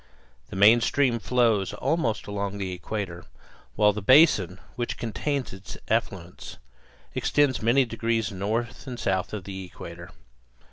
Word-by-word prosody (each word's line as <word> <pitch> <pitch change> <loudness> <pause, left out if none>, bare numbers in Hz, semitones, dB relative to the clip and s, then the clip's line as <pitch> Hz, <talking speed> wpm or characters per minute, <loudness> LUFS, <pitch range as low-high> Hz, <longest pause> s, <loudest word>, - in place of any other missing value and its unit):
The - - -8
main 105 +5 +6
stream 125 -2 +2
flows 115 -5 +1
almost 130 -2 -1
along 100 -1 -3
the 95 -2 -3
equator, 90 0 -5 0.5
while 105 -1 +4
the 105 - -5
basin 100 - +5 0.2
which 120 -1 -3
contains 130 +3 -3
its 95 +1 -9
affluents - - -3 0.6
extends 145 -4 +1
many 120 +4 +4
degrees 115 -2 -1
north 110 +7 -3
and 125 -2 -6
south 95 -1 -1
of 105 -3 -5
the 95 0 -7
equator. 85 -1 -10
105 Hz, 135 wpm, -26 LUFS, 95-120 Hz, 0.6 s, main